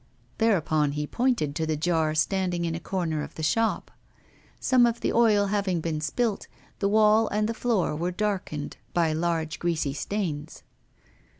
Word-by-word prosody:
Thereupon 155 -9 +2
he 150 0 -2
pointed 235 - 0
to 160 +1 -1
the 155 -1 0
jar 160 -1 +1
standing 180 +1 0
in 165 - -1
a 165 - -3
corner 170 -4 -2
of - - -8
the 160 - -6
shop. 225 +9 0 0.7
Some 250 -2 +4
of 235 0 -2
the - - 0
oil 215 -3 +4
having 195 -4 0
been 160 -1 -3
spilt, 210 +8 -1 0.3
the 200 - +1
wall 215 +1 +4
and 210 +1 0
the 230 - -2
floor 225 -9 0
were 170 +3 -1
darkened 185 -6 -3 0.2
by 165 -2 +2
large 165 -1 -1
greasy 160 -5 -1
stains. 160 -2 -4
175 Hz, 165 wpm, -26 LUFS, 155-210 Hz, 0.7 s, Some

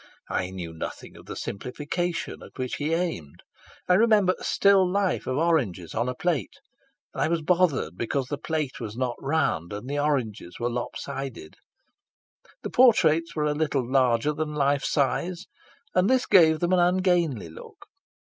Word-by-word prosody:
I 90 - -1
knew 90 -3 -7
nothing 80 - -7
of - - -15
the - - -6
simplification 155 - -4
at - - -14
which 130 -1 -3
he 150 +2 -2
aimed. 165 - -4 0.4
I 180 - +4
remember 210 -2 +4
a - - -10
still 200 -1 +4
life 200 -1 0
of 130 - -1
oranges 130 - 0
on 120 - -1
a 125 - -4
plate, 155 - -1 0.6
and - - -4
I - - +3
was 165 -1 -1
bothered 165 - +1
because 130 +3 -1
the 145 +2 -5
plate 155 -3 -3
was 110 -2 -6
not 125 -2 -1
round 135 - 0
and 105 +4 -6
the 145 +1 -2
oranges 125 -11 -2
were 120 +1 -1
lop 120 0 -4
sided. 135 - -6 1.1
The - - -4
portraits 165 -10 +4
were 150 -1 0
a 150 - +1
little 145 -5 -1
larger 130 +1 +2
than 150 0 -3
life 140 -1 +1
size, 170 +6 0 0.5
and 185 +2 +3
this 260 -1 +3
gave 160 -4 +5
them 175 +1 +1
an 185 - +4
ungainly 175 - +1
look. 80 - -13
145 Hz, 170 wpm, -26 LUFS, 125-175 Hz, 1.1 s, gave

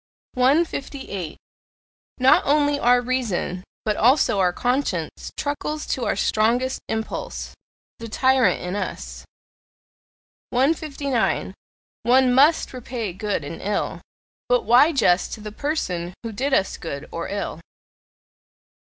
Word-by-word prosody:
158. 265 - 0 0.8
Not 260 +1 +5
only 290 0 +2
our 245 0 +4
reason, 235 -8 -2 0.2
but 215 -1 +1
also 245 -3 +3
our 180 -2 +3
conscience, 245 - -2
truckles 300 +1 -3
to 250 - -2
our - - 0
strongest 240 +4 +1
impulse 220 0 -4 0.5
the 230 0 -7
tyrant 260 0 +3
in 180 +2 -4
us. 65 - -5 1.3
159. 275 -5 0 0.5
One 250 +2 +4
MUST 290 +5 +4
repay 240 -5 -5
good 205 -3 -2
and 155 +3 -7
ill; 205 +1 -2 0.5
but - - +3
why 255 +7 +6
just 190 - +2
to - - -6
the 210 0 -7
person 185 - -3
who 230 - -4
did 265 +7 -2
us 195 -8 +1
good 140 -3 -6
or 170 - -4
ill? 200 -5 -4
245 Hz, 115 wpm, -23 LUFS, 195-275 Hz, 1.3 s, why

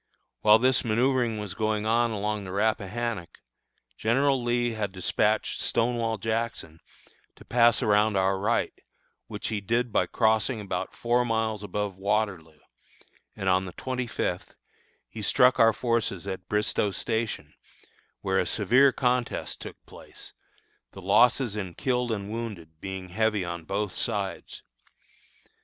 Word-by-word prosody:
While 105 0 +7
this 130 +2 +2
manoeuvring 120 0 +1
was 105 -3 -5
going 110 0 -1
on 115 +2 +2
along 105 -1 -2
the 95 - -7
Rappahannock, 110 -1 -2 0.6
General 135 +4 +2
Lee 120 0 +1
had 105 -3 -3
despatched 100 +3 0
Stonewall 115 -1 0
Jackson, 110 -7 -3 0.6
to - - -16
pass 120 0 +4
around 105 -1 +3
our 95 0 +2
right, 110 +4 0 0.5
which - - -5
he 105 -2 -2
did 115 +4 0
by - - +2
crossing 110 +1 +1
about 100 -2 -4
four 120 +1 +1
miles 110 -3 -1
above 105 -1 -3
Waterloo, 95 -6 -1 0.8
and, 95 - -4
on 95 0 +3
the 90 - -8
twenty 125 -1 -3
fifth, - - -3 0.5
he 110 - -8
struck 125 +5 +4
our 115 0 +7
forces 115 -5 -1
at 95 -1 -6
Bristoe 105 0 +1
Station, 110 +3 -3 0.7
where - - +1
a - - 0
severe 135 +2 +4
contest 125 -2 -1
took - - -8
place, - - -12 0.6
the 95 - -10
losses 115 +3 +4
in 95 -5 -5
killed 125 -2 0
and 100 -1 -3
wounded 100 -9 -6
being 95 -1 -6
heavy 105 0 0
on 85 -1 -6
both 100 +2 -2
sides. - - -4
110 Hz, 140 wpm, -27 LUFS, 100-120 Hz, 0.8 s, While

